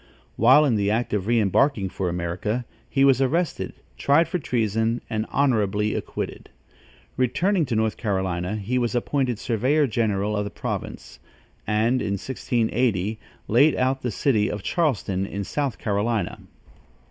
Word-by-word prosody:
While 130 +7 +6
in 120 -6 +2
the 100 0 +1
act 115 +2 0
of 100 -1 -1
re 120 0 +3
embarking 105 0 +2
for 90 -1 -2
America, 90 +7 -2 0.2
he 135 0 +3
was 135 -1 +4
arrested, 160 +5 0 0.3
tried 145 +4 +4
for 180 - -2
treason 115 -3 0
and 110 0 -1
honorably 105 -6 +1
acquitted. - - -5 0.7
Returning 160 - +1
to 120 - -1
North 110 -1 0
Carolinia, 95 -2 -2
he 115 +5 -1
was 120 0 -1
appointed 125 -1 0
surveyor 130 +8 +1
general 105 -4 0
of 105 - 0
the 100 - -4
province, - - -6 0.5
and, 110 +4 +2
in 100 - -1
1680, 110 -2 -1 0.3
laid 140 +7 +4
out 130 +1 0
the 125 - -2
city 110 -2 +1
of 105 -2 -5
Charleston 105 - 0
in 100 0 -4
South 140 +4 -2
Carolinia. 105 -1 -1
115 Hz, 145 wpm, -24 LUFS, 105-130 Hz, 0.7 s, While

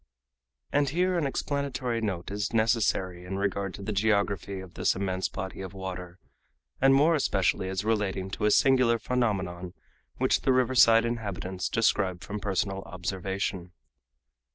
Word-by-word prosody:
And 145 -1 +3
here 180 +5 +1
an 165 -5 +1
explanatory 130 -4 -2
note 95 -4 -3
is 105 +2 -3
necessary 110 -6 +1
in 95 +2 -5
regard 100 -1 -2
to 100 - -9
the 105 - -3
geography 100 -2 0
of 95 -2 -10
this - - +1
immense 95 -1 -2
body 95 +1 -6
of 95 0 -7
water, 90 -2 -6 0.6
and 135 0 +6
more 150 +5 +5
especially 95 - +1
as 95 +2 -3
relating 100 -4 -1
to 105 - -2
a - - +5
singular 130 -1 +4
phenomenon 95 -8 -2 0.4
which - - +2
the 130 - +3
riverside 120 -3 +5
inhabitants 100 -5 -3
describe 95 -5 +1
from 105 +1 -5
personal 95 -1 -1
observation. 95 0 -4
100 Hz, 145 wpm, -28 LUFS, 95-115 Hz, 0.6 s, and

